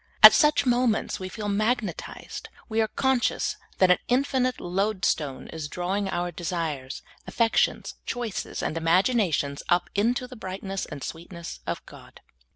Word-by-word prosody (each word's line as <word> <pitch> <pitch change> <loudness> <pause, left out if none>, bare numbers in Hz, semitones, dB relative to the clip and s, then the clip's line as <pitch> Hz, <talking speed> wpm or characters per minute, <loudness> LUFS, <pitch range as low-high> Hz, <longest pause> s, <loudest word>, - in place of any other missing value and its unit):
At - - +13
such 300 -2 +4
moments 245 -3 +1
we 185 0 -5
feel 210 +2 -5
magnetized; 215 -2 -2 0.2
we 225 -1 +1
are 220 - +2
con 265 +3 +1
scious - - 0 0.2
that 185 -1 +5
an 180 - +4
infinite 255 -1 +1
load 190 +1 -1
stone 140 -4 -1
is 160 -2 -5
drawing 190 +5 -2
our 175 0 -1
desires, 160 -6 -4 0.2
affections, 230 -1 +1
choices, 235 -5 -3
and - - -1
imaginations 165 - +2
up 175 0 +2
into 235 +5 +1
the 255 - -10
bright 190 -4 -6
ness 195 -1 -3
and 145 -3 -7
sweetness 170 +1 -7
of - - -3
God. - - -14
195 Hz, 155 wpm, -26 LUFS, 170-235 Hz, 0.2 s, At